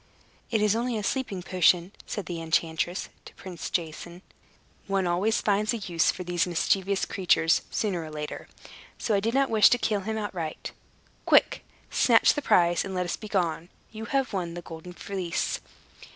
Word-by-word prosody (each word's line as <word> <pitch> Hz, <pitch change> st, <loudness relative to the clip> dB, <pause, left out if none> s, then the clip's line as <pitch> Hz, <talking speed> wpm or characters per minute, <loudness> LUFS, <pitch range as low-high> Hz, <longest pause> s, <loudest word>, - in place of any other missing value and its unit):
"It 220 Hz, -2 st, +1 dB
is 210 Hz, 0 st, +3 dB
only 235 Hz, 0 st, -1 dB
a 210 Hz, -, -3 dB
sleeping 200 Hz, -6 st, -2 dB
potion," 180 Hz, 0 st, +3 dB, 0.2 s
said 205 Hz, -, -4 dB
the 170 Hz, -2 st, -5 dB
enchantress 165 Hz, +2 st, -1 dB, 0.2 s
to -, -, -13 dB
Prince 180 Hz, +1 st, -7 dB
Jason. 170 Hz, +2 st, -4 dB, 0.6 s
"One 195 Hz, -1 st, +1 dB
always 185 Hz, +6 st, +1 dB
finds 210 Hz, +2 st, +1 dB
a -, -, -2 dB
use 175 Hz, -6 st, +1 dB
for 180 Hz, -, -7 dB
these 175 Hz, 0 st, 0 dB
mischievous 190 Hz, +3 st, +1 dB
creatures, 175 Hz, -3 st, +2 dB
sooner 190 Hz, -6 st, -1 dB
or 155 Hz, -, -8 dB
later; 150 Hz, -1 st, -6 dB, 0.5 s
so 220 Hz, -, -1 dB
I 200 Hz, -, +3 dB
did 225 Hz, +5 st, -1 dB
not 275 Hz, -2 st, +2 dB
wish 215 Hz, -2 st, +7 dB
to 245 Hz, -, +3 dB
kill 215 Hz, -3 st, 0 dB
him 220 Hz, +3 st, -3 dB
outright. 180 Hz, -7 st, -4 dB, 0.6 s
Quick! -, -, +4 dB, 0.3 s
Snatch -, -, +5 dB
the 295 Hz, -, -3 dB
prize, 175 Hz, -8 st, +3 dB
and 190 Hz, -1 st, -5 dB
let 180 Hz, 0 st, 0 dB
us 175 Hz, -, -2 dB
begone. 180 Hz, -5 st, -2 dB, 0.2 s
You 220 Hz, 0 st, -7 dB
have 270 Hz, -1 st, -1 dB
won 175 Hz, -3 st, -3 dB
the 175 Hz, -, -7 dB
Golden 165 Hz, +2 st, -9 dB
Fleece." 180 Hz, -2 st, -3 dB
185 Hz, 175 wpm, -27 LUFS, 170-210 Hz, 0.6 s, wish